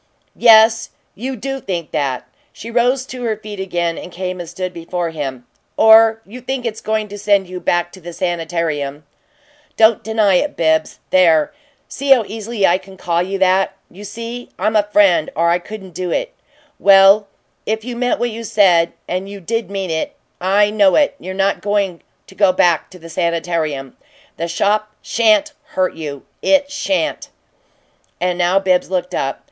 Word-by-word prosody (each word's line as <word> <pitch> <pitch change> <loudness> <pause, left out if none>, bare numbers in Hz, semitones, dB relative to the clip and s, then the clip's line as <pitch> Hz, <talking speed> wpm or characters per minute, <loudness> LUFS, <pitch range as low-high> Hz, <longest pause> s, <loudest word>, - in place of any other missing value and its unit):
"Yes, 225 0 +5 0.2
you 260 +5 -5
do 270 +4 -4
think 175 -8 -5
that!" 135 -3 -2 0.2
She 230 - -9
rose 250 +2 +1
to 255 -1 -8
her 225 -3 -1
feet 210 -2 -9
again 175 -3 -2
and 180 - -9
came 185 0 -5
and 170 -2 -7
stood 185 +1 -5
before 170 0 -4
him. 135 -5 -5 0.3
"Or 225 0 +6
you 245 +6 -11
think 255 0 -4
it's 220 -2 -4
going 215 0 -1
to 205 +1 -8
send 200 -2 +2
you 180 0 -6
back 175 0 0
to 185 - -14
the 175 +1 -8
sanitarium. 165 -5 -3 0.7
Don't 220 0 +4
deny 215 -4 +2
it, 295 +9 -2
Bibbs. 160 -1 +1
There! 165 -5 +4 0.3
See 280 +1 -5
how 260 -4 +6
easily 220 -1 -2
I 180 +2 +3
call 185 -3 -3
you 190 +2 -2
that! 190 0 +2 0.2
You 195 +4 -12
see 230 +4 -7
I'm 215 +3 0
a 210 - +6
friend, 190 -7 +4
or 170 +1 +2
I 175 - +2
couldn't 190 -1 -10
do 180 +1 -4
it. - - -2 0.5
Well, 195 +1 +6 0.4
if 220 +1 -2
you 250 -1 -5
meant 245 +1 0
what 240 0 -1
you 230 +1 -7
said 180 -6 +3
and 185 +2 -3
you 200 0 -8
did 225 +4 -3
mean 195 -3 -3
it, 160 0 -3 0.2
I 205 +3 +2
know 205 -3 +4
it! 290 - +3
you're 185 +1 -7
not 195 +1 0
going 200 -4 -1 0.2
to - - -16
go 190 0 +3
back 175 -3 +2
to 185 - -13
the 165 -1 -12
sanitarium. 165 -5 -2 0.4
The 170 - -2
shop 210 +5 0
sha'n't 215 -3 +2 0.2
hurt 185 0 +1
you. 145 -4 -7 0.2
It 285 0 +2
sha'n't!" 290 +1 -2 0.9
And 180 0 -1
now 175 +2 +2
Bibbs 185 -2 +1
looked 180 -1 -2
up. 135 0 -2
195 Hz, 175 wpm, -18 LUFS, 175-220 Hz, 0.9 s, Or